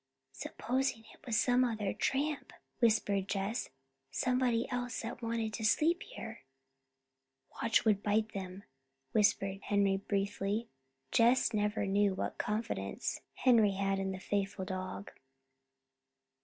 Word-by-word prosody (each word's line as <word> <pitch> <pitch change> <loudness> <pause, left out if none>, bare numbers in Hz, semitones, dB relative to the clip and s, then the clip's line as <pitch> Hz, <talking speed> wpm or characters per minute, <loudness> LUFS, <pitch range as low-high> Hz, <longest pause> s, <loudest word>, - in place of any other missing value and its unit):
"Supposing 240 - -2
it - - -21
was 225 -3 +2
some 250 0 +4
other 215 -5 -1
tramp," 285 +2 -1 0.3
whispered 205 -4 +2
Jess, 200 +4 -2 0.4
"somebody 250 -2 +1
else 245 -1 -2
that 230 +2 -5
wanted 230 -1 -2
to 220 - -4
sleep 320 - +3
here!" 230 - -8 1.2
"Watch 230 0 +3
would 210 -2 +3
bite 215 +1 +1
'em," 190 0 -6 0.5
whispered 195 -2 +2
Henry 200 -1 +2
briefly. 200 +2 -1 0.4
Jess 235 +1 +4
never 210 0 +1
knew 200 0 +2
what - - -3
confidence 215 +2 -2
Henry 225 -6 +5
had 195 0 0
in 190 0 -1
the 190 - -5
faithful 195 -1 -2
dog. 185 +1 -5
215 Hz, 120 wpm, -33 LUFS, 195-235 Hz, 1.2 s, Henry